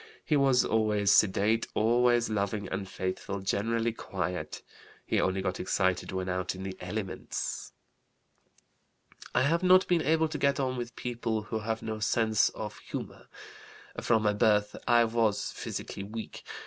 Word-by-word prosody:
He 155 - +2
was 135 -3 +4
always 105 -2 +2
sedate, 105 +3 +3
always 120 +2 +3
loving, 100 -1 -1
and 95 0 -4
faithful; 95 +2 -3
generally 115 +4 0
quiet. 90 -4 -4 0.4
He - - +1
only 95 0 0
got 95 -1 -2
excited 95 -1 0
when 95 0 -3
out 90 0 -2
in 95 - -7
the 95 -1 -5
elements.) 95 +1 -4 1.6
I - - +4
have 165 +5 +2
not 185 0 +5
been 175 -2 +3
able 160 +1 +2
to 155 -1 -4
get 140 0 +2
on 130 -1 0
with 120 -1 -5
people 115 -3 -2
who 110 +1 -3
have 110 +1 -3
no 110 -1 -4
sense 110 0 +2
of - - -7
humor. - - -7 0.7
From 110 -2 +2
my 105 -1 +3
birth 105 -1 +2
I 120 -1 +5
was 110 -2 0
physically - - -6
weak. 110 +3 -7
110 Hz, 150 wpm, -29 LUFS, 100-120 Hz, 1.6 s, not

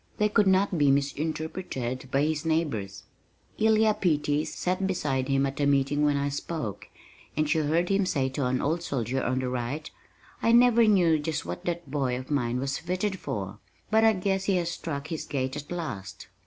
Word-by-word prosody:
They 210 0 +2
could 205 -1 +3
not 190 -2 +3
be 145 -1 +4
misinterpreted 140 -2 -2
by 135 +2 +2
his 155 0 0
neighbors. 150 -12 -1 0.6
Elia 220 0 +4
Peattie 150 -7 +1
sat 185 +2 -1
beside 135 -8 -1
him 135 0 +2
at 140 +2 -4
a 145 - +2
meeting 140 +1 +2
when 145 -1 +3
I 140 0 0
spoke, 140 - -4 0.5
and 155 0 +2
she 160 +2 +2
heard 160 +3 +1
him 195 -1 +2
say 135 -6 +1
to 130 0 -1
an 125 0 0
old 160 +4 0
soldier 130 -4 -2
on 130 +1 0
the 130 -1 -1
right, 130 +5 -4 0.5
"I 230 - +3
never 235 -1 +6
knew 175 -6 +4
just 150 - -3
what 85 +1 -6
that 170 -4 -3
boy 135 -4 0
of 130 +3 -8
mine 125 -4 0
was 135 0 -2
fitted 185 +3 -2
for, 100 0 -5 0.3
but 220 0 +4
I 225 0 +6
guess 190 0 -1
he 195 - +2
has 175 -1 0
struck 155 -3 -5
his 160 - -3
gait 130 -2 -2
at 145 +2 -7
last." 115 - -6
150 Hz, 195 wpm, -27 LUFS, 135-180 Hz, 0.6 s, never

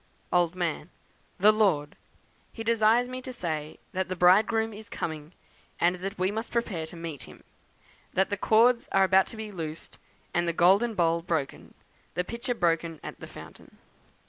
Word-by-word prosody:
"Old 175 -1 +3
Man. 175 -3 -2 0.5
'The 210 +3 +6
Lord. 185 -9 +1 0.6
He 225 - -7
desires 230 +2 +3
me 255 0 -6
to 255 - -7
say 155 -9 -4
that 190 0 -2
the 185 - -2
Bridegroom 215 +5 +4
is 215 +2 -11
coming, 155 -5 -5 0.5
and 175 +1 +2
that 195 +2 -5
we 185 +2 +1
must 220 +3 -4
prepare 200 -9 -2
to 165 - -11
meet 165 -4 -7
him; - - -15 0.7
that 190 +2 +2
the - - +1
cords 230 +4 +3
are 195 - +4
about 190 0 +4
to 225 - -9
be 215 -1 -6
loosed, 160 -4 -7 0.3
and 175 0 +1
the 170 - +1
golden 200 +7 +4
bowl 170 -2 +2
broken; 165 -5 -3 0.4
the 180 - 0
pitcher 235 +5 -4
broken 165 -3 0
at - - -8
the - - -9
fountain.' - - -13
185 Hz, 170 wpm, -27 LUFS, 170-220 Hz, 0.7 s, The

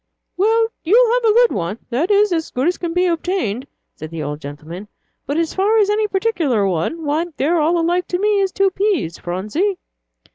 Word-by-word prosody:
"Well, 450 +4 +2
you'll 460 +7 +4
have - - +1
a 435 - +5
good 480 +1 +4
one, 175 +4 -3
that 280 +9 0
is, 410 -2 +3
as 325 -1 -2
good 255 +5 -1
as 355 - 0
can 345 -2 -3
be 360 +2 +1
obtained," 335 - -1 0.3
said 155 - -9
the 165 -1 -5
old 150 +1 -5
gentleman; 155 +7 -8 0.4
"but 285 - -1
as 330 -1 0
for 410 +4 +2
any 420 0 +2
particular 350 - 0
one, 190 - -2
why, 305 +4 0
they're 325 +5 +1
all 335 +3 +2
alike 350 +2 0
to 355 - -1
me 415 0 +2
as 385 -1 0
two 390 0 +2
peas, 375 - -1
Phronsie." 215 - -2
345 Hz, 195 wpm, -19 LUFS, -, 0.4 s, a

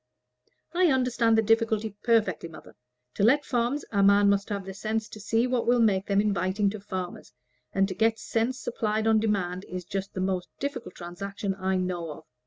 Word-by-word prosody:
"I 360 +1 +4
understand 250 -5 +2
the 220 - +4
difficulty 220 -1 +1
perfectly, 210 -8 +1
mother. 160 - -13 0.4
To - - -1
let 275 +7 +4
farms, 245 +4 0
a 200 -2 +2
man 200 +1 +5
must 200 0 0
have 200 -2 -3
the 190 - -6
sense 215 +2 -2
to 215 - -10
see 225 +3 +1
what 250 -2 0
will 245 0 +4
make 200 -4 +2
them 200 -1 +2
inviting 200 0 +1
to 215 - -6
farmers, 185 -2 -6 0.4
and 195 0 +2
to 190 - -4
get 225 +3 +2
sense 235 +3 -1
supplied 215 -1 -1
on 220 -1 +4
demand 190 -4 -1
is 180 -1 -5
just 195 +2 -5
the - - -3
most 185 -1 -1
difficult 280 -3 -4
transaction 195 +3 -4
I 190 0 -1
know 180 -2 -2
of. 150 - -13
205 Hz, 195 wpm, -27 LUFS, 190-225 Hz, 0.4 s, man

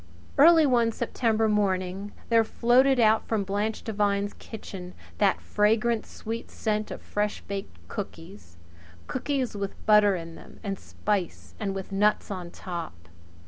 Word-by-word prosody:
Early 320 +2 +7
one 240 -4 +3
September 225 -1 0
morning 195 -1 0 0.2
there 230 -1 +5
floated 250 +4 +3
out 220 -1 +4
from 220 -3 0
Blanche 205 +3 -2
Devine's 205 -2 0
kitchen 185 -5 -9 0.2
that 200 -2 +4
clean, - - -21
fragrant, 220 +2 +2
sweet 225 +1 -6
scent 215 -1 -2
of - - -7
fresh 210 0 -2
baked 200 0 -6
cookies 175 - -8 0.5
cookies 260 -2 -2
with 200 -1 -5
butter 210 -2 +6
in 165 -1 -6
them, - - -14
and 195 -2 -3
spice, 200 -5 -3
and 195 -2 -2
with 195 +1 -6
nuts 210 +2 +2
on 180 -3 -5
top. 165 - -7
210 Hz, 140 wpm, -27 LUFS, 195-225 Hz, 0.5 s, Early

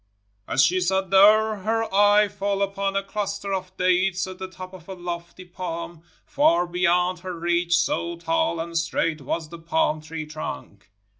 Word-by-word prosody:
As 135 - +3
she 185 +4 +2
sat 190 +1 0
there, 215 +2 +6
her 225 +3 0
eye 205 +1 +5
fell 200 0 -1
upon 195 0 -2
a 195 - +1
cluster 200 0 -3
of 185 -1 -5
dates 185 0 +2
at 185 0 -9
the 190 - -5
top 185 0 -10
of 185 -1 -13
a 190 - -5
lofty 175 0 -7
palm, 170 -2 -6 0.2
far 180 - +3
beyond 180 0 +1
her 180 -1 -6
reach, 175 0 +2
so 170 0 -1
tall 320 - 0
and 170 +1 -5
straight 165 -1 0
was 155 +3 -3
the 170 0 -10
pahn 160 -2 0
tree 155 0 -6
trunk. 100 - -8
180 Hz, 170 wpm, -24 LUFS, 170-195 Hz, 0.2 s, there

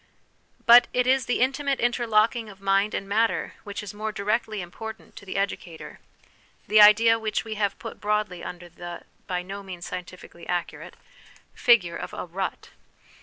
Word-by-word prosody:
But 240 +1 +8
it 250 0 +2
is 260 0 +2
the 245 - 0
intimate 270 +1 +1
interlocking 230 -1 +1
of 195 -1 -13
mind 195 +1 +1
and 195 - -4
matter 220 +3 0
which 205 0 -6
is 205 - -7
more 215 +1 -4
directly 215 +1 -1
important 220 +5 -9
to 200 - -12
the 185 - -4
educator 185 -4 -4 0.7
the 215 0 +6
idea 225 +2 +7
which 215 -1 -2
we 220 - -4
have 205 -2 -1
put 225 - -9
broadly 210 -4 -1
under 175 0 -8
the 175 0 -9 0.2
(by 180 -1 -2
no 195 +2 -7
means 180 -3 -8
scientifically 180 -1 -9
accurate) 175 -1 -4 0.6
figure 190 -9 +3
of - - -5
Il8 - - -8
HOME - - -5
EDUCATION 170 - -10
a - - -21
rut. 190 0 -4
210 Hz, 175 wpm, -25 LUFS, 185-225 Hz, 0.7 s, But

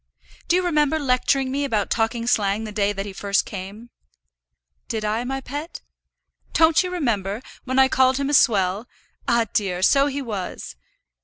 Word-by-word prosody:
Do 345 - +3
you 365 - +2
remember 305 -2 +2
lecturing 265 -1 +1
me 280 +2 -1
about 220 -7 -1
talking 230 +1 0
slang 210 -3 +1
the 215 - -6
day 205 -1 +1
that 195 -1 -4
he 200 - -7
first 200 0 0
came?" 205 +5 -8 1.0
"Did 220 -1 -3
I, 220 +3 -1
my 270 +2 -3
pet?" 290 +6 -7 0.7
"Don't 320 0 +5
you 365 - -3
remember, 220 - -1 0.3
when 260 0 -2
I 265 0 +6
called 260 0 +3
him 280 0 -1
a - - -2
swell? 205 -3 +3 0.4
Ah, 235 -1 +3
dear! 185 -3 -1
so 275 +7 +4
he 285 0 -3
was. 205 - -6
235 Hz, 170 wpm, -22 LUFS, 205-275 Hz, 1.0 s, I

